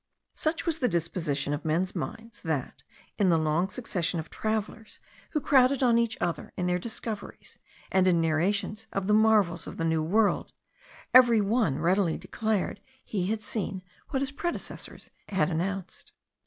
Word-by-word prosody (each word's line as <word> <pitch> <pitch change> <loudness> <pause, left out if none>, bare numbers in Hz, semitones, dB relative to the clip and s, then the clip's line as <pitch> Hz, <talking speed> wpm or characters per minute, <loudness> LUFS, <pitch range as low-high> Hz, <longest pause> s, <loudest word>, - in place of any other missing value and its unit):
Such 320 +1 -1
was 325 -2 0
the 250 - +2
disposition 160 - -1
of 145 - -3
men's 170 +5 0
minds, 225 +9 -6
that 155 -6 -3 0.4
in 195 -3 +4
the 165 - +4
long 160 +4 +1
succession 190 -7 -2
of 160 - -7
travellers, 220 0 -3 0.4
who 305 - +2
crowded 270 -1 +4
on 235 -2 +5
each 235 -1 0
other 170 -3 -2
in 180 - -1
their 180 0 +1
discoveries 220 0 -7 0.3
and 190 -1 +4
in 175 -2 +4
narrations 195 +7 0
of 195 -1 -2
the 210 - +2
marvels 210 -6 +3
of - - -8
the 165 - -1
New 160 -1 +1
World, 205 +6 +1 0.6
every 245 -3 +8
one 205 - +1
readily 175 +1 +2
declared 215 -2 -2 0.2
he 185 -4 -2
had 215 +1 -2
seen 195 -4 -3 0.3
what 270 -1 0
his 275 - -1
predecessors 345 +5 -5 0.2
had 180 -4 +1
announced. 185 +3 -3
195 Hz, 160 wpm, -28 LUFS, 170-225 Hz, 0.6 s, every